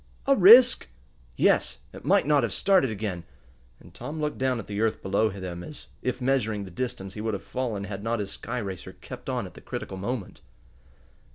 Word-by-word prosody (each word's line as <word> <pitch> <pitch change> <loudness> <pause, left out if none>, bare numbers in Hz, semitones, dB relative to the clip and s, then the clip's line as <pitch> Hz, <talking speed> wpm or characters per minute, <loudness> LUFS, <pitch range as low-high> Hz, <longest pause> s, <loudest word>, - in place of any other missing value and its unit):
"A 275 - +5
risk?" 235 - +8 0.5
"Yes; - - +2 0.2
it - - -10
might - - +3
not 145 -1 +4
have 115 -5 -1
started 190 -9 +3
again," 100 -5 -4 0.6
and - - -17
Tom 155 +2 -6
looked 150 -1 -2
down 130 -1 +1
at 110 - -6
the 105 0 -3
earth 110 -1 0
below 100 +3 +2
them, 90 -3 -6
as 150 - -10 0.2
if 125 0 -2
measuring 120 -6 0
the 95 - -9
distance 95 -2 -4
he 105 - -6
would 110 -1 -1
have - - -7
fallen 115 -6 -3
had 100 0 -6
not 115 +1 0
his 100 -2 -4
sky 120 +5 -5
racer 95 -6 -5
kept - - -9
on - - -1
at - - -10
the - - -13
critical 95 - -6
moment. 105 +1 -5
110 Hz, 200 wpm, -26 LUFS, 100-130 Hz, 0.6 s, risk